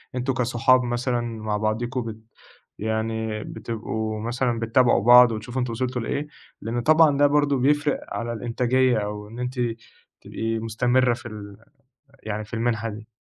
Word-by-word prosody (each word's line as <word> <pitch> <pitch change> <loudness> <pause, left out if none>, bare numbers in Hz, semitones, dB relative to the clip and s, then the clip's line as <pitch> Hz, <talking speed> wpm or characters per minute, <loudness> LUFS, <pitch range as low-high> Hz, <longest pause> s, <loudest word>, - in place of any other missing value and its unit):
أنتم 125 +1 -1
كصحاب 125 +1 +3
مثلًا 120 0 -1
مع 110 -3 -3
بعضكم 120 +4 -1
بت 110 -1 -6 0.6
يعني 110 0 -2
بتبقوا 110 -1 -4
مثلًا 120 0 -1
بتتابعوا 120 0 +3
بعض 120 0 +8
وتشوفوا 115 +4 -4
أنتم 125 -1 -2
وصلتوا 125 +1 -2
لإيه؟ 140 +5 -3 0.3
لأنه 120 +2 -2
طبعًا 155 0 +5
ده 145 0 +5
برضو 145 -1 +2
بيفرق 145 +2 +2
على 120 0 -3
الإنتاجية، 125 +1 +1
أو 105 0 -4
إن 115 +3 -10
أنتِ 125 +1 -4 0.6
تبقي 115 0 -3
مستمرة 120 +2 +2
في 120 0 -8
ال 100 -2 -9 0.7
يعني 105 0 -4
في 110 - -9
المنحة 115 -1 -1
دي. 105 +1 -8
120 Hz, 150 wpm, -24 LUFS, 110-125 Hz, 0.7 s, بعض